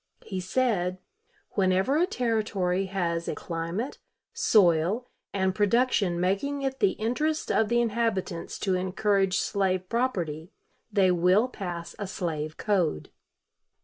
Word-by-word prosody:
He 190 -3 -4
said: 185 -3 0 0.5
"Whenever 190 +7 +2
a 345 +4 +3
Territory 210 - 0
has 170 -3 -2
a - - -2
climate, 170 +9 -4 0.3
soil, 205 - +3 0.3
and 190 -1 0
production 205 -3 +2
making 200 +11 0
it 265 0 -2
the 400 - +3
interest 300 +8 -1
of 220 -1 +2
the 240 0 +3
inhabitants 220 -6 -1
to 190 - +1
encourage 195 +1 +1
slave 185 -3 0
property, 180 -10 -1 0.4
they 195 -3 +4
will 180 +6 +4
pass 175 -8 -6
a 205 - -3
slave 160 -5 -3
code." 180 - 0
195 Hz, 120 wpm, -27 LUFS, 180-230 Hz, 0.5 s, they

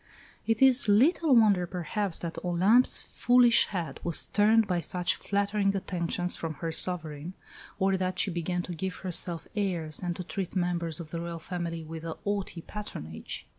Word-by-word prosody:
It 225 +2 +2
is 265 -1 +6
little 275 - +4
wonder, 205 -6 +4
perhaps, 180 +2 -3
that 170 -1 -6
Olympe's 190 +8 +3
foolish 245 -1 +4
head 170 -8 -4
was 170 -2 -1
turned 220 +2 +4
by 180 -3 0
such 180 +1 0
flattering 200 0 0
attentions 180 -2 -2
from 160 -2 -4
her 165 +1 -4
sovereign, 165 -1 -2 0.4
or 190 -1 +2
that 185 0 -2
she 195 - +1
began 175 +1 -2
to 180 - -6
give 185 +3 -4
herself 175 -2 -2
airs 175 -7 -1
and 175 -1 -2
to 180 - -5
treat 185 +1 -5
members 175 -3 -1
of 160 -3 -8
the 170 - -3
Royal 170 0 -5
family 170 -1 -4
with 160 0 -8
a 165 -1 -4
haughty 200 -4 -3
patronage. 80 - -7
180 Hz, 170 wpm, -28 LUFS, 170-205 Hz, 0.4 s, is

